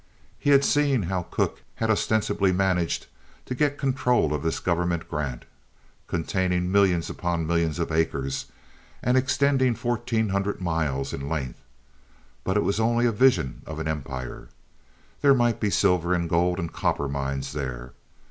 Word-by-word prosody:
He - - 0
had 140 -1 +6
seen 140 -6 +2
how 90 +1 -1
Cooke - - -1
had 110 -1 0
ostensibly 105 -2 +1
managed 90 -2 0 0.4
to - - -4
get 145 +2 +1
control 125 - +1
of 75 - -2
this 80 +1 -1
government 85 -1 -1
grant, 70 -6 -4 0.6
containing 90 +1 0
millions 95 -4 +3
upon 85 -2 -2
millions 85 -1 0
of 85 -1 -2
acres 70 -4 -1 0.6
and 125 - +2
extending 130 -1 +2
fourteen 115 -2 -1
hundred 100 +1 -1
miles 80 -6 -1
in 70 +1 -4
length; 70 -5 -4 0.8
but 95 +2 0
it 105 - +2
was 100 +2 0
only 115 +2 +2
a 120 - +3
vision 110 - +2
of 80 0 -6
empire. 65 -5 -5 0.7
There 140 -1 +6
might 120 -2 +2
be 105 - +1
silver 90 -2 +2
and 85 -1 -1
gold 90 +2 +2
and 85 -3 -4
copper 70 - 0
mines 70 0 -3
there. 65 -3 -5
90 Hz, 150 wpm, -25 LUFS, 80-115 Hz, 0.8 s, had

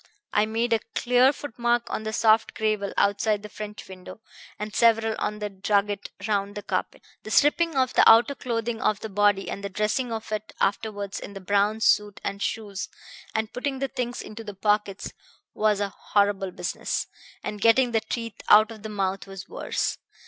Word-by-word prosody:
I 210 +1 +3
made 230 +2 0
a 225 - +3 0.2
clear 250 +2 +4
footmark 240 -4 -1
on - - -2
the 220 0 -4
soft 220 0 +3
gravel 215 -2 0
outside 205 +1 +2
the 210 - -8
French 210 0 -8
window, 185 +3 -10 0.4
and 210 0 -5
several 225 -1 +3
on 210 - -2
the 210 -1 -3
drugget 200 +1 0 0.2
round 200 -1 -1
the 205 - -6
carpet. - - -3 0.2
The - - -9
stripping 310 +6 +3
off 260 -1 +2
of - - -13
the - - +7
outer 230 +5 +6
clothing 230 -3 -3
of 215 -1 +1
the 220 - -5
body 205 -1 +2
and 200 - -5
the 200 - -3
dressing 215 +5 -1
of 220 -1 -5
it 215 0 -4
afterwards 205 0 -1
in 200 - -9
the 195 - -7
brown 205 +3 +1
suit 210 -2 +3
and 200 0 -4
shoes, 205 -3 -3 0.5
and 220 0 -1
putting 270 +1 -2
the 270 0 -2
things 245 -2 -3
into 215 +1 -9
the 205 -2 -8
pockets, 205 0 0 0.4
was 210 -1 +2
a 200 -1 -1
horrible 200 -1 0
business; - - -3 0.4
and 210 -1 -5
getting 240 +3 +5
the 225 -1 +2
teeth 230 -1 -5
out 215 +2 +7
of 220 -2 -10
the 220 - -6
mouth 195 -2 -2
was 195 -1 -9
worse. - - -2
215 Hz, 190 wpm, -26 LUFS, 205-230 Hz, 0.5 s, the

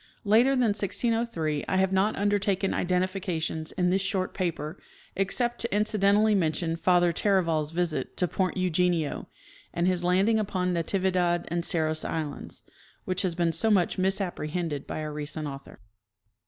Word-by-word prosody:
Later 230 +6 +4
than 250 -4 +2
1603 205 - 0
I 190 - 0
have 190 0 +2
not 195 +3 +2
undertaken 200 -1 0
identifications 180 -3 -1
in 180 -1 +1
this 190 +1 +2
short 190 -1 -1
paper, 170 -2 -3 0.3
except 240 +5 0
to 235 - +1
inci 210 0 0
dentally 205 +2 +4
mention 165 -2 0
Father 175 0 +3
Taraval's 165 -6 +1
visit 165 -5 -2
to 180 - +2
point 190 +2 -1
Eugenio, 180 -3 0 0.4
and 170 - -1
his 180 -1 +1
landing 195 +5 +3
upon 185 -3 -1
Natividad 175 0 0
and 170 0 -1
Cerros 155 -2 +1
islands, 155 -3 -5 0.4
which 185 -1 -1
has 180 -4 -1
been 170 -1 +1
so 220 +8 +2
much 190 -3 +2
misapprehended 175 -5 -2
by - - -4
a 155 0 -4
recent 150 +1 -5
author. 140 -1 -9
180 Hz, 150 wpm, -27 LUFS, 165-195 Hz, 0.4 s, Later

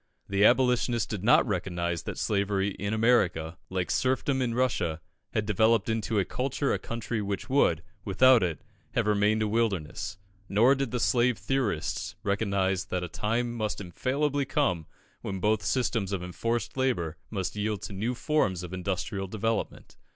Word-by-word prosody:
The 100 0 +1
Abolitionist 125 -1 +3
did 100 -4 -4
not 120 - +5
recognise 85 -4 -2
that - - -6
slavery 100 -1 0
in 100 +1 -4
America, 95 -8 +2
like 90 -1 -2
serfdom 130 +1 +1
in 120 -2 0
Russia, 110 -10 0 0.4
had 105 - +1
developed 110 +1 +3
into 110 -3 0
culture 135 +5 -1
a - - -1
country 115 -1 -3
which 100 +5 -4
would, 85 - +3 0.2
without 125 +5 +5
it, 85 -4 -2 0.3
have 115 - +1
remained 105 +1 +2
a - - +1
wilderness; 105 -3 -1 0.3
nor 115 +7 +5
did 135 -2 -1
the 125 - -2
slave 120 -1 +2
theorists 105 -4 -2
recognise 100 -2 0
that 90 -2 -2
a - - -3
time 115 +8 -1
must 110 -3 -2
infallibly 140 - -1
come 95 - 0 0.3
when 95 -1 -4
both 105 +2 +2
systems 115 -6 0
of 95 -3 -2
enforced 115 +6 -2
labour 105 -12 0
must 95 -2 -3
yield 105 0 -2
to - - -6
new 110 +6 -2
forms 110 - 0
of 90 0 -7
industrial 95 +1 -3
development. 110 +3 -3
105 Hz, 160 wpm, -28 LUFS, 95-120 Hz, 0.4 s, not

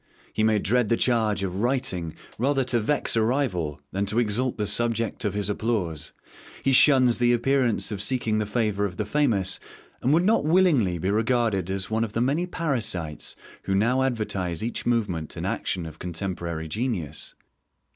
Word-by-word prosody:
He - - -1
may 110 -1 +3
dread 110 +2 +1
the 115 - +3
charge 110 -5 +1
of 95 0 -3
writing 105 -9 -1 0.2
rather 135 +2 +2
to 125 -1 +1
vex 145 +5 0
a 115 - +3
rival 110 - 0
than 100 +2 -1
to 105 +3 -2
exalt 120 +2 +1
the 105 - -1
subject 115 +1 -1
of 100 -1 -1
his 105 -1 -1
applause. 100 -8 -2 0.5
He 135 - +2
shuns 130 -3 +5
the 120 0 +4
appearance 120 -2 +1
of 100 -2 -3
seeking 110 -2 +1
the 105 - -1
favour 105 -2 0
of 90 -3 -5
the 105 - -1
famous, 105 -7 +1 0.4
and 130 - +2
would 165 +3 +4
not 220 +3 +3
willingly 150 - +3
be 95 +4 -1
regarded 110 -4 +1
as 95 +2 -3
one 110 +1 +1
of 110 -2 -4
the 115 - 0
many 145 +8 +1
parasites 110 - -3 0.3
who 95 - 0
now 120 +6 +2
advertise 105 -9 -1
each 120 +1 -3
movement 100 -10 -1
and - - -3
action 90 -3 -2
of 80 - -9
contemporary 85 -2 -4
genius. 85 - -3
110 Hz, 175 wpm, -25 LUFS, 95-125 Hz, 0.5 s, shuns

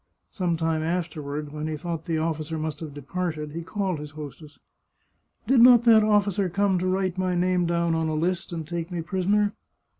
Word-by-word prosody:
Some 175 -4 -1
time 160 -1 0
afterward, 155 -3 -3
when 155 0 -4
he 155 -1 -3
thought 165 0 -5
the 165 -2 -1
officer 160 0 -2
must 155 -1 -4
have 160 -3 -6
departed, 150 +1 -4
he 165 +3 -5
called 190 -1 -2
his 150 0 -7
hostess. 150 0 -9 0.5
" - - -46
Did 260 -3 +5
not 245 -1 +8
that 225 -2 +6
officer 205 -3 +2
come 195 0 +1
to 185 - -1
write 185 -1 0
my 185 -1 0
name 180 0 +1
down 170 -1 +1
on 160 0 0
a 155 - -1
list 175 +4 -1
and 165 -3 -5
take 170 0 -4
me 175 -3 -4
prisoner 200 +4 +1
170 Hz, 200 wpm, -25 LUFS, 155-185 Hz, 0.5 s, not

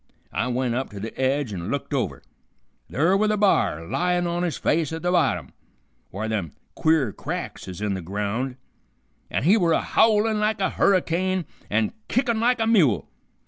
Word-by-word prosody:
I 120 - 0
went 125 -1 0
up 130 +2 -2
to 100 - -9
the 110 +3 -6
edge 130 -3 0
an' 90 0 -5
looked 140 - -3
over. - - -2 0.7
Ther' 165 +8 +2
were 215 +2 +2
the 210 0 +1
b'ar 190 - +2
layin' 180 - 0
on 170 0 -1
his 170 -6 -1
face 160 -1 +1
at 160 +1 -5
the 175 - +1
bottom, 90 - +1 0.6
whar 110 +5 -4
them 100 -8 -2 0.2
queer 155 -8 +2
cracks - - -5
is 95 +1 -7
in 105 -1 0
the 95 - -3
ground, 105 +8 -3 0.7
an' - - -1
he 190 +9 +5
were 170 -5 +3
a - - +2
howlin' 220 0 +3
like 215 0 +1
a 190 - +1
hurricane 185 -1 +1 0.2
and 110 +1 +1
kickin' 240 -3 +1
like 245 +1 +2
a 225 - +2
mule. 185 - +3
160 Hz, 185 wpm, -24 LUFS, -, 0.7 s, he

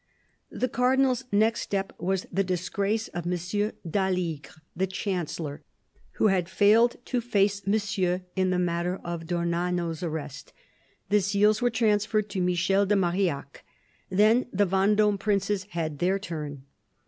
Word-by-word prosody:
The 255 - -1
Cardinal's 255 +1 +2
next 220 +3 +2
step 195 -1 -2
was 190 +1 -1
the 195 +3 +1
disgrace 195 +4 -1
of 175 -1 -5
M. 180 0 0 0.5
d'Aligre, 180 -5 -1 0.3
the 190 +3 0
Chancellor, 175 -6 -4 0.5
who - - 0
had 185 -2 +1
failed 215 +5 +4
to 250 -2 -1
face 200 -4 +1
Monsieur 195 -3 0
in 185 -1 +1
the 180 - +1
matter 175 +1 -1
of 170 -1 -5
d'Ornano's 170 -1 -1
arrest. 150 -4 -5 0.6
The 210 0 +4
seals 205 +3 +2
were 245 - +3
transferred 215 -2 +1
to 190 - -2
Michel 185 +3 +2
de 205 - +3
Marillac. 175 -7 -1 0.5
Then 215 +6 +4
the 200 +1 +2
Vendome 200 +2 +2
princes 200 -1 0
had 165 -6 -4
their 185 +2 +2
turn. 150 -7 -6
190 Hz, 135 wpm, -27 LUFS, 175-210 Hz, 0.6 s, failed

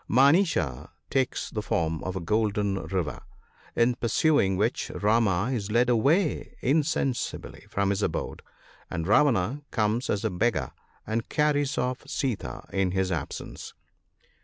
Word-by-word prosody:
Manicha 135 - +3 0.2
takes 130 -2 0
the 105 - -2
form 80 -5 -1
of 95 0 -4
a - - -1
golden 100 0 0
deer, 90 -6 -2 0.6
in 120 +1 +3
pursuing 115 - +2
which - - 0
Rama 105 0 +2
is 105 -4 -3
led 120 +3 +3
away 145 - +1
insensibly 140 -2 -1
from 100 0 0
his 100 +1 -1
abode, - - -2 0.5
and 85 -1 -3
Ravana 120 - +3
comes 110 +2 0
as 105 +2 0
a 110 - +1
beggar 110 +6 0 0.3
and 110 +1 -2
carries 145 -2 +1
off 125 0 -1
Sita 135 -6 -3
in 95 -1 +1
his 95 -1 0
absence. 80 -5 -5
110 Hz, 135 wpm, -27 LUFS, 95-135 Hz, 0.6 s, Manicha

